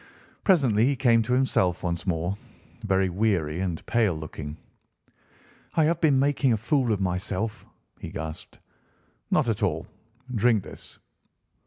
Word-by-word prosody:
Presently 130 - +4
he 140 - +2
came 120 -3 +4
to 115 +3 -1
himself 95 -9 +1
once 85 +2 -3
more, 85 +2 0 0.5
very 95 -2 +2
weary 90 -5 0
and 90 -4 -3
pale 110 -7 +2
looking. 75 -1 -7 1.2
"I 160 - +4
have 165 +2 +1
been 150 -5 +4
making 140 -1 +2
a - - +1
fool 125 +2 +1
of 105 - +1
myself," 95 +3 -2 0.3
he - - -6
gasped. 80 -1 -7 0.7
"Not 150 -5 +2
at 115 -1 -1
all. 85 -5 0 0.5
Drink 110 -2 +3
this." - - -10
105 Hz, 140 wpm, -26 LUFS, 90-125 Hz, 1.2 s, Presently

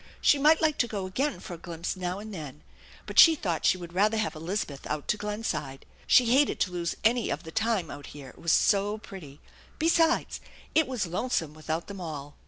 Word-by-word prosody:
She 290 - +4
might 305 +3 +5
like 310 -2 +2
to 240 - +3
go 205 -4 -4
again 265 +10 -2
for 185 - -8
a 170 - -8
glimpse 170 +2 -5
now 180 0 -3
and 215 +1 -8
then, 150 -4 -8 0.4
but - - +1
she 325 -1 +9
thought 175 - -1
she - - +3
would 175 -1 -9
rather 210 +4 +2
have 215 -1 -1
Eliza 175 +6 -2
beth 140 -2 -10
out 150 -1 -4
to - - +3
Glenside. 205 -10 -4 0.2
She 250 - +6
hated 290 +1 +3
to 185 - +1
lose 175 -1 -2
any 235 +1 +2
of 155 - -3
the 160 - -9
time 215 -4 0
out 145 0 -9
here, 140 -3 -10
it - - -17
was 170 - 0
so 205 +1 +3
pretty. 165 -9 -11 0.4
Besides, 325 0 +2 0.3
it 320 -2 +3
was 250 -6 -2
lonesome 175 -4 -2
without 155 +1 -4
them 200 -2 -8
all. 145 -4 -6
185 Hz, 215 wpm, -28 LUFS, 160-225 Hz, 0.4 s, she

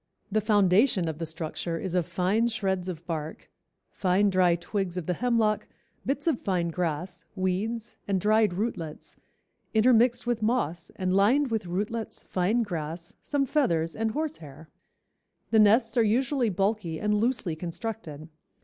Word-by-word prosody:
"The 215 +2 +2
foundation 205 -1 +3
of 160 -1 -4
the 165 - -3
structure 165 +1 -4
is 180 +1 -4
of 180 -3 +1
fine 200 +6 +1
shreds 190 -5 -1
of 170 -2 -7
bark, 160 -2 -5 0.4
fine 195 +2 +2
dry 180 -2 +4
twigs 185 +1 -3
of 180 - -3
the 180 - 0
hemlock, 230 0 +1 0.4
bits 285 +2 -1
of 320 -8 +1
fine 180 -3 0
grass, 175 +1 -3
weeds 210 +5 -2
and 195 -2 +1
dried 215 -1 +3
rootlets, 175 -7 -4 0.6
intermixed 240 +2 +4
with 240 -2 -1
moss 215 -8 0
and 185 -1 -1
lined 240 +8 +3
with 220 -5 -1
rootlets, 210 +5 -3
fine 200 +6 +1
grass, 170 -3 -5
some 285 -2 0
feathers 170 - +1
and 225 0 0
horse 310 0 -2
hair." 150 +1 -12 0.8
The 220 - +5
nests 215 +5 +4
are 235 - +6
usually 245 +3 +1
bulky 195 -4 -1
and 210 0 +1
loosely 210 -6 0
constructed. 170 -2 -6
195 Hz, 150 wpm, -27 LUFS, 175-225 Hz, 0.8 s, are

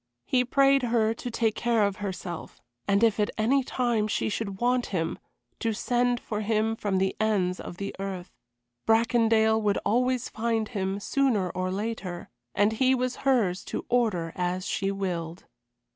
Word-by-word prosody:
He 250 -1 +2
prayed 275 +2 +4
her 230 -2 +2
to 245 - -6
take 225 -2 +1
care 235 -2 +1
of 200 -1 -2
herself, 180 -4 -6 0.3
and 200 +2 +3
if 225 -2 +3
at 210 - +2
any 255 +5 +2
time 240 -4 0
she 215 - -1
should 200 -2 -4
want 245 0 +1
him 165 -4 -2 0.4
to 225 -1 0
send 245 +2 +1
for 210 -3 -4
him 220 +1 +1
from 205 -3 -1
the 190 0 0
ends 195 -4 +1
of 175 - -8
the 200 +1 -5
earth. 190 -2 -5 0.6
Bracondale 225 -1 +3
would 205 -2 +1
always 250 +2 +1
find 225 -1 -1
him, 195 -3 -2
sooner 215 -6 +1
or 185 0 -2
later, 195 -3 -4 0.3
and 205 +2 +3
he 260 +3 +3
was 250 -1 -2
hers 225 -9 +1
to - - -4
order 210 -9 +1
as 180 +1 -2
she 195 - -1
willed. 175 -3 -4
215 Hz, 165 wpm, -27 LUFS, 195-240 Hz, 0.6 s, prayed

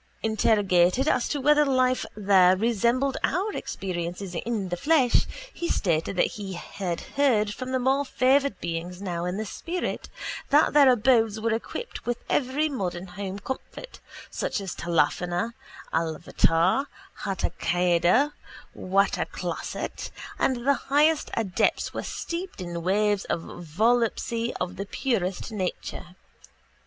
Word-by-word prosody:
Interrogated 210 - +3
as 250 -5 +2
to 290 - -1
whether 300 +2 +5
life 255 -2 +2
there 190 -3 +5
resembled 235 +5 +1
our 390 +6 0
experience 175 -2 -4
in 195 +2 -3
the 175 - -1
flesh 280 - +3 0.3
he 345 - -3
stated 165 -1 0
that - - +4 0.2
he 195 -1 -5
had 175 0 -4
heard 230 -8 +1
from 255 +2 -2
more 270 +2 +3
favoured 270 -3 +2
beings 170 +1 -4
now 175 -3 -3
in 180 +2 -2
the 220 - -3
spirit 345 - -4 0.4
that 295 +2 +4
their 285 -2 +7
abodes 225 -3 +3
were 225 +1 0
equipped 480 - -5
with 240 -1 0
every 285 +3 +1
modern 185 - -3
home 195 +1 -5
comfort 265 - -7 0.3
such - - -2
as 195 -3 -5
tālāfānā, 175 +5 0 0.4
ālāvātār, 165 - +1 0.3
hātākāldā, 180 - +1 0.4
wātāklāsāt 195 +2 -2 0.3
and 260 - +2
that 240 - -7
the 280 +2 +4
highest 295 +3 +2
adepts 200 -5 0
were - - -3
steeped 350 - -5
in 175 -2 -4
waves 205 +3 +1
of - - -1
volupcy 230 +7 0
of 180 - -3
the 200 - -3
very - - -29
purest 215 -6 -1
nature. 185 -2 -4
210 Hz, 130 wpm, -26 LUFS, 180-260 Hz, 0.4 s, their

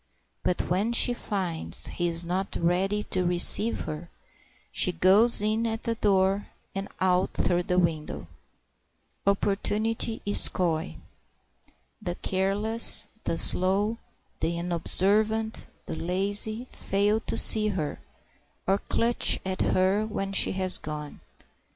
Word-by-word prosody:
But 180 - -1
when 200 +7 -1
she 245 +1 +5
finds 185 -8 0
he 175 - -2
is 170 0 -1
not 185 +3 -3
ready 190 +5 -1
to 185 - 0
receive 180 +6 +2
her, 155 +3 -7 0.6
she 180 - +2
goes 200 +6 +4
in 220 +2 0
at 225 0 -5
the 230 - -2
door 195 -2 0 0.3
and 195 +1 -5
out 185 0 0
through 175 -1 +1
the 180 - +1
window." 160 - -2 1.0
Opportunity 210 +3 -1
is 205 - +2
coy. 170 -1 -2 1.1
The 175 -4 -4
careless, 200 +5 +2 0.2
the 165 - -2
slow, 200 +7 0 0.4
the 170 +1 -2
unobservant, 210 +6 +1 0.2
the - - -6
lazy 205 +7 +1
fail 205 -2 -1
to - - -4
see 215 -1 +6
her, 175 -8 -4 0.7
or 195 +1 +1
clutch 235 +1 +1
at 190 0 -3
her 190 +3 +1
when 195 -2 -5
she - - +2
has 185 -1 0
gone. 150 -1 -8
195 Hz, 125 wpm, -26 LUFS, 180-215 Hz, 1.1 s, see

